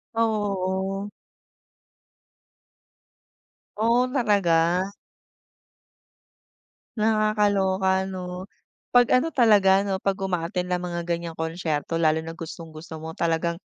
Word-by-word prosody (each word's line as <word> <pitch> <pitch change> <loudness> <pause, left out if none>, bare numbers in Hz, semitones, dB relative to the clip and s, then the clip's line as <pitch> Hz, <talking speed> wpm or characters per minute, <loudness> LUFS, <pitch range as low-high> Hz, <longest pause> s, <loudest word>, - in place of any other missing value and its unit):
Oo. 195 -3 -1 2.7
Oh, 235 +3 +2
talaga? 185 - +2 2.1
Nakakaloka 200 -3 +2
'no, 185 +1 -6 0.4
pag 245 0 +5
ano 255 +6 +3
talaga 200 -7 +4
'no, 195 -1 -2
pag-uma-attend 185 -3 -1
ng 180 -1 -2
mga 175 -1 -4
ganyang 170 -1 -3
konsyerto. 160 -1 -3
Lalo 160 0 +2
na 165 - -6
gustong-gusto 165 -1 -9
mo 160 +1 -7
talagang 170 +1 -1
190 Hz, 85 wpm, -24 LUFS, 170-205 Hz, 2.7 s, pag